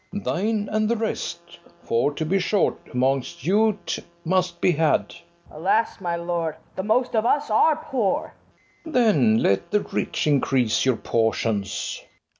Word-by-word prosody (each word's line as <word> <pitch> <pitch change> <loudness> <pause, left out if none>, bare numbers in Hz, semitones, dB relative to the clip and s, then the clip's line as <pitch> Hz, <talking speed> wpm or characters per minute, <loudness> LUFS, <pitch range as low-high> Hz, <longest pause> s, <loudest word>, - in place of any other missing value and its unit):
FERNEZE. 205 - -5
Thine 210 +2 -1
and 215 0 +1
the 235 - +2
rest; 215 -6 -4 0.2
For, 115 +5 +1
to 160 - -2
be 190 +5 +1
short, 195 +2 +1 0.2
amongst 135 +6 -1
you't 210 +2 +1 0.3
must 180 0 0
be - - +3
had. 160 -1 +1
FIRST - - -15 0.3
JEW. - - -13
Alas, 195 +7 +1
my 175 -2 -1
lord, 170 -2 -2 0.2
the - - -2
most 230 +5 +1
of 220 - +3
us 285 +1 +1
are 305 +8 +4
poor! 255 -9 -2 0.5
FERNEZE. 320 -1 -9
Then 150 - +4
let 100 0 +1
the 210 - +2
rich - - -2
increase 135 -6 +2
your 130 -3 +2
portions. 110 -3 -1
180 Hz, 160 wpm, -23 LUFS, 140-215 Hz, 0.5 s, are